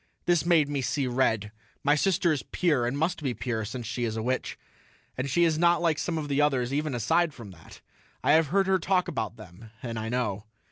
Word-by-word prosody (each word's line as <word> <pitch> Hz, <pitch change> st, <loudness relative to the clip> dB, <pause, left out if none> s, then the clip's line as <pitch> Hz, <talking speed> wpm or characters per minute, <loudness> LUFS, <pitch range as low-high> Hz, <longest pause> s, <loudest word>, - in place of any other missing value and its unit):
This 175 Hz, -1 st, +2 dB
made 165 Hz, -4 st, +4 dB
me 145 Hz, -1 st, -2 dB
see 135 Hz, +2 st, -1 dB
red; 115 Hz, -5 st, 0 dB, 0.3 s
my 145 Hz, -, +4 dB
sister 170 Hz, +2 st, +2 dB
is 145 Hz, -5 st, 0 dB
pure 145 Hz, -2 st, 0 dB
and 130 Hz, +3 st, -2 dB
must 160 Hz, +3 st, -1 dB
be 130 Hz, -5 st, -2 dB
pure, 110 Hz, 0 st, -2 dB
since 120 Hz, +3 st, -6 dB
she 120 Hz, +2 st, -3 dB
is 115 Hz, -1 st, -2 dB
a 110 Hz, -, -2 dB
witch. 130 Hz, +2 st, -2 dB, 0.6 s
And 130 Hz, +2 st, -3 dB
she 170 Hz, +6 st, +3 dB
is 160 Hz, -2 st, +2 dB
not 170 Hz, 0 st, +4 dB
like 165 Hz, -3 st, +1 dB
some 170 Hz, -2 st, -2 dB
of 155 Hz, -2 st, -3 dB
the 140 Hz, 0 st, +1 dB
others 135 Hz, -3 st, +1 dB
even 150 Hz, -2 st, -1 dB
aside 150 Hz, +7 st, +1 dB
from 110 Hz, -5 st, -10 dB
that. 85 Hz, -3 st, -15 dB, 0.4 s
I -, -, +3 dB
have 160 Hz, 0 st, +5 dB
heard 195 Hz, +6 st, +2 dB
her 190 Hz, 0 st, +2 dB
talk 180 Hz, +1 st, +1 dB
about 110 Hz, 0 st, -3 dB
them 110 Hz, +1 st, -13 dB
and 115 Hz, -2 st, -4 dB
I 110 Hz, 0 st, -4 dB
know. 110 Hz, -4 st, -2 dB
140 Hz, 230 wpm, -27 LUFS, 115-160 Hz, 0.6 s, have